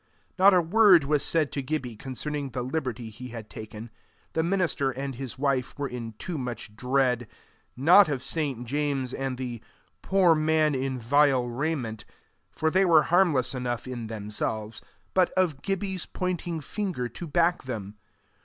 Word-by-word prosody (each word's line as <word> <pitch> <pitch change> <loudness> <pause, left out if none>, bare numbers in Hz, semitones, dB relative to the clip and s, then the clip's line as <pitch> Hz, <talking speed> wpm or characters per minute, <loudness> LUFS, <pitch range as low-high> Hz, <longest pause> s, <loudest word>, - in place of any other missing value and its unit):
Not 195 +2 +8
a 180 - +5
word 190 -2 +6
was 145 +1 +1
said 155 -3 +1
to 140 - -2
Gibbie 130 -4 -3
concerning 135 +4 -4
the 125 0 -4
liberty 125 -4 -3
he 125 +4 -9
had 115 -3 -9
taken: 110 +1 -9 0.4
the 160 - +1
minister 170 -5 +1
and 135 +1 -4
his 130 0 -6
wife 135 -2 -1
were 145 -1 -2
in 120 -3 -6
too 160 - -5
much 120 -4 -6
dread 125 0 +1 0.5
not 175 +7 +7
of 135 -3 -2
St. 140 -7 -2
James 140 -1 -1
and 135 -1 -3
the 120 -3 -5 0.4
"poor 190 -3 +4
man 155 -1 +2
in 130 0 -2
vile 130 +1 +3
raiment," 120 -4 -3 0.5
for 160 0 0
they 190 +3 +4
were 165 -4 +6
harmless 170 -10 +3
enough 125 -1 -3
in 120 -3 -5
themselves, 110 0 -4 0.3
but 185 -2 +4
of 175 -7 +1
Gibbie's 195 -2 -2
pointing 175 -3 -3
finger 180 - -3
to 170 +7 -8
back 170 +1 +1
them. 105 -4 -6
135 Hz, 160 wpm, -27 LUFS, 120-160 Hz, 0.5 s, Not